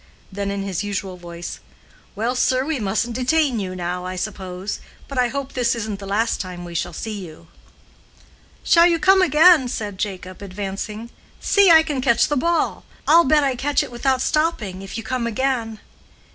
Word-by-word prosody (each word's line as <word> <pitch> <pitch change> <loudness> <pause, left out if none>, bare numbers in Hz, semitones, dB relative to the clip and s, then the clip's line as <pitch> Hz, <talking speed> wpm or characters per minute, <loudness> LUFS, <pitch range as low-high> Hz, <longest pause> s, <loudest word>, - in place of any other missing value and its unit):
Then 200 +1 -3
in 200 0 -3
his 195 -1 -3
usual 195 -2 -4
voice, 175 -1 -8 0.6
"Well, 230 +4 -1
sir, 255 +1 +1
we 310 -3 -2
mustn't 220 +3 -1
detain 260 -1 +1
you 185 -2 -4
now, 180 0 -3
I 185 0 -5
suppose; 185 0 -5 0.3
but 275 -2 -3
I 250 - +3
hope 275 +2 -5
this 245 -2 +1
isn't 215 -3 -4
the 195 - -8
last 220 +4 0
time 180 -2 -7
we 170 - -8
shall 175 +1 -2
see 210 +3 -5
you." 165 -1 -13 1.1
"Shall 340 0 +6
you 340 -1 +2
come 380 +3 +5
again?" 320 -3 +6
said 205 -5 -5
Jacob, 185 -3 -5
advancing. 205 +3 -6 0.3
"See, 400 -2 +4
I 320 -1 +8
can 295 -5 -2
catch 235 -3 +3
the 295 - +1
ball; 335 +5 0 0.2
I'll 335 +3 +6
bet 295 +2 +4
I 270 -2 +1
catch 280 +3 +1
it - - -8
without 255 +2 0
stopping, 235 - -1
if 195 +3 -7
you 225 - -5
come 235 +1 -2
again." 230 -2 -1
225 Hz, 185 wpm, -21 LUFS, 195-275 Hz, 1.1 s, I